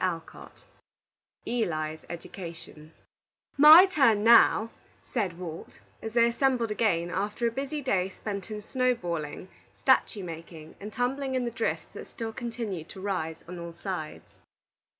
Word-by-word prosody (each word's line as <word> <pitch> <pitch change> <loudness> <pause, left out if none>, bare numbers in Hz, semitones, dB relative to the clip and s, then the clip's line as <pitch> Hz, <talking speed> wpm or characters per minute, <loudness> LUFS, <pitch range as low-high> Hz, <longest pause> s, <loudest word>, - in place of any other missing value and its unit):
ELI'S 160 -10 -2
EDUCATION 165 -3 -9 0.6
"My 310 +6 +10
turn 270 - +3
now," 230 -1 +6 0.4
said 195 -8 -1
Walt, 170 -3 -8 0.2
as 220 0 -6
they 235 0 +5
assembled 235 -2 +1
again, 175 -6 0
after 205 +5 -2
a 230 - +2
busy 280 +4 -4
day 190 -7 +1
spent 200 +1 -6
in 210 -1 -6
snow 255 +1 +1
balling, 170 -4 -5 0.3
statue 240 -6 +2
making, 165 -2 -9
and 210 +2 -7
tumbling 260 +2 -1
in 255 -1 0
the 235 - -2
drifts 230 0 -3
that - - -9
still 225 -2 -6
continued 225 -8 -5
to - - -10
rise 185 -5 -3
on 180 0 -7
all 170 0 -7
sides. 170 -3 -6
210 Hz, 135 wpm, -28 LUFS, 170-240 Hz, 0.6 s, My